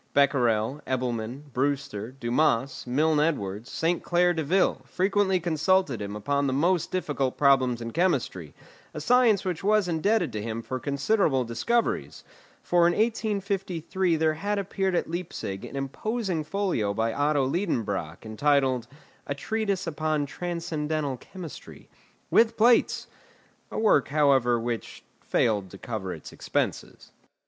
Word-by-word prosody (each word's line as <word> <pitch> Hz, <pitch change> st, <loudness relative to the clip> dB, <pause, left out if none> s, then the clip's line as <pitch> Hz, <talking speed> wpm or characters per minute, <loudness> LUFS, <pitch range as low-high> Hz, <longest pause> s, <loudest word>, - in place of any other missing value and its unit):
Becquerel, 130 Hz, -2 st, +2 dB
Ebelman, 125 Hz, +2 st, -3 dB
Brewster, 130 Hz, -5 st, -2 dB
Dumas, 130 Hz, 0 st, 0 dB
Milne 150 Hz, +4 st, +2 dB
Edwards, 115 Hz, -8 st, -1 dB
Saint 170 Hz, +2 st, 0 dB
Claire 175 Hz, 0 st, +2 dB
Deville 165 Hz, +4 st, +1 dB
frequently 190 Hz, 0 st, +1 dB
consulted 160 Hz, -, +1 dB
him 100 Hz, 0 st, -5 dB
upon 140 Hz, +6 st, 0 dB
the 130 Hz, -, 0 dB
most 170 Hz, +5 st, +1 dB
difficult 145 Hz, -8 st, -1 dB
problems 130 Hz, -4 st, +3 dB
in 115 Hz, -, -5 dB
chemistry, 130 Hz, -, -1 dB, 0.4 s
a -, -, -3 dB
science 235 Hz, +2 st, +4 dB
which 180 Hz, -3 st, -3 dB
was 210 Hz, -1 st, +3 dB
indebted 175 Hz, -, +1 dB
to 105 Hz, -, -3 dB
him 115 Hz, +1 st, -4 dB
for 130 Hz, +2 st, -4 dB
considerable 140 Hz, -, +1 dB
discoveries, 120 Hz, -, -1 dB, 0.4 s
for 175 Hz, -1 st, +4 dB
in 175 Hz, -, +2 dB
1853 195 Hz, -5 st, 0 dB
there 160 Hz, 0 st, +2 dB
had 205 Hz, +6 st, -2 dB
appeared 195 Hz, -1 st, -1 dB
at -, -, 0 dB
Leipzig 160 Hz, -, -5 dB
an -, -, -9 dB
imposing 175 Hz, -, -2 dB
folio 155 Hz, -, -1 dB
by 115 Hz, +1 st, 0 dB
Otto 145 Hz, -1 st, +2 dB
Liedenbrock, 105 Hz, -, -2 dB
entitled, 130 Hz, +1 st, +1 dB, 0.4 s
"A 140 Hz, -, -2 dB
Treatise 200 Hz, +3 st, -2 dB
upon 155 Hz, -2 st, -1 dB
Transcendental 155 Hz, -3 st, -3 dB
Chemistry," 175 Hz, +5 st, -10 dB, 0.4 s
with 230 Hz, 0 st, +4 dB
plates; 235 Hz, +2 st, +4 dB, 0.6 s
a -, -, -6 dB
work, 210 Hz, -, +3 dB
however, 135 Hz, -5 st, +3 dB
which 115 Hz, 0 st, -4 dB, 0.2 s
failed 105 Hz, -5 st, 0 dB
to 95 Hz, -, -11 dB
cover 100 Hz, -4 st, -5 dB
its -, -, -9 dB
expenses. -, -, -3 dB
150 Hz, 130 wpm, -26 LUFS, 125-185 Hz, 0.6 s, science